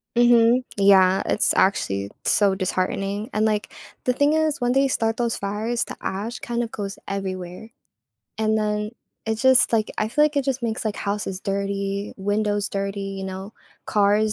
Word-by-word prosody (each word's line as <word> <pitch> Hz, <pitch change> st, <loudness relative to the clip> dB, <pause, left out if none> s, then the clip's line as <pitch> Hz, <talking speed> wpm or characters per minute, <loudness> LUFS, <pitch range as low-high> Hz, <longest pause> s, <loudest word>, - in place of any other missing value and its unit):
Mhm. 240 Hz, +1 st, +4 dB
Yeah. 190 Hz, -1 st, +5 dB
It's -, -, +5 dB
actually 100 Hz, -, +1 dB
so 200 Hz, -2 st, +3 dB
disheartening, 195 Hz, +3 st, -2 dB
and, 215 Hz, +1 st, +1 dB
like, 210 Hz, -1 st, -1 dB, 0.3 s
the 250 Hz, -, +2 dB
thing 285 Hz, +3 st, +2 dB
is 315 Hz, -4 st, +1 dB
when 245 Hz, 0 st, +1 dB
they 270 Hz, +1 st, +3 dB
start 225 Hz, -3 st, 0 dB
those 235 Hz, -2 st, 0 dB
fires, 215 Hz, +4 st, -1 dB
the -, -, -8 dB
ash, 215 Hz, +5 st, -4 dB
kind 240 Hz, 0 st, -2 dB
of, 230 Hz, -, -6 dB
goes 200 Hz, -1 st, -5 dB
everywhere, 190 Hz, +1 st, -5 dB, 0.7 s
and 220 Hz, 0 st, +1 dB
then, 210 Hz, 0 st, -1 dB, 0.4 s
it, 220 Hz, -, 0 dB
just, 260 Hz, +3 st, +5 dB
like 220 Hz, -2 st, +1 dB
I 215 Hz, -, 0 dB
feel, 300 Hz, +5 st, +3 dB
like, 300 Hz, -1 st, -1 dB
it, 275 Hz, -, -1 dB
just, 265 Hz, -2 st, -1 dB
makes, 225 Hz, -2 st, -2 dB
like, 215 Hz, -2 st, -2 dB
houses 200 Hz, -2 st, -3 dB
dirty, 200 Hz, 0 st, -3 dB
windows 205 Hz, +1 st, -1 dB
dirty, 195 Hz, 0 st, -3 dB, 0.2 s
you 190 Hz, -, -5 dB
know, 190 Hz, +2 st, -7 dB, 0.3 s
cars 210 Hz, +1 st, +2 dB
210 Hz, 170 wpm, -23 LUFS, 195-235 Hz, 0.7 s, Yeah